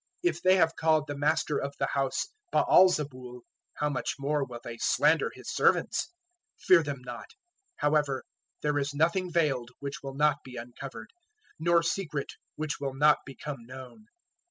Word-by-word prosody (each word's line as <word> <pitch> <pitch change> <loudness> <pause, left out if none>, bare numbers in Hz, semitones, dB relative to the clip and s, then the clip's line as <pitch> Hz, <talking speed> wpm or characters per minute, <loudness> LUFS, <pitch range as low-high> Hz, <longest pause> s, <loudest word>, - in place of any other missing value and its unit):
If 355 - 0
they 185 0 +5
have 165 -3 +3
called 155 -2 +2
the 145 - -5
master 145 +1 +1
of 140 0 -4
the - - +1
house 135 - -1 0.2
Baal 185 +1 +6
zebul, 130 -7 -4 0.3
how 150 - 0
much 130 -4 -2
more 145 +1 0
will 120 -3 -7
they 115 -1 -7
slander 150 +4 +3
his - - -8
servants? - - +2 0.5
010:026 - - -16
Fear 185 -3 +7
them 140 -3 -4
not, 120 -1 -7 0.5
however; 145 -3 +1 0.4
there 150 -1 +1
is 140 0 -3
nothing 170 +4 +1
veiled 140 -8 +1
which 140 0 -6
will 135 -1 -7
not 150 0 +3
be 130 -1 -11
uncovered, 120 -1 -8 0.5
nor 170 +1 +3
secret 165 -5 -2 0.2
which 155 -1 -3
will 135 -2 -3
not 150 +2 +5
become 135 -1 -7
known. 130 - -11
145 Hz, 165 wpm, -29 LUFS, 135-155 Hz, 0.5 s, Fear